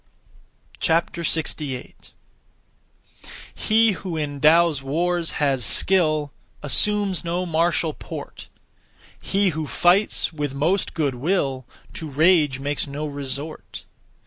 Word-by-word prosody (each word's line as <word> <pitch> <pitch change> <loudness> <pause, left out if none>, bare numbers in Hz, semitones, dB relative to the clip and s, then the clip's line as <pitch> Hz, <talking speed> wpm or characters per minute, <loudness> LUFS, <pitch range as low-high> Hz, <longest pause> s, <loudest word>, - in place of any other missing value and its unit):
68. 160 -5 -2 1.4
He 225 +1 +3
who 185 -3 -5
in 145 -2 -4
(Tao's) 160 -1 +4
wars 170 +5 -1
has 135 -4 0
skill 155 - +2 0.3
Assumes 200 - +3
no 175 +2 -2
martial 165 -1 0
port; - - -9 0.7
He 200 0 +1
who 155 -2 -4
fights 180 +2 +2
with 145 -3 -4
most 170 +7 0
good 145 -5 0
will 135 -2 -1 0.3
To 160 - -6
rage 150 -2 +3
makes 145 +1 -2
no 145 +2 -5
resort. 145 +1 -7
155 Hz, 100 wpm, -22 LUFS, 145-175 Hz, 1.4 s, Tao's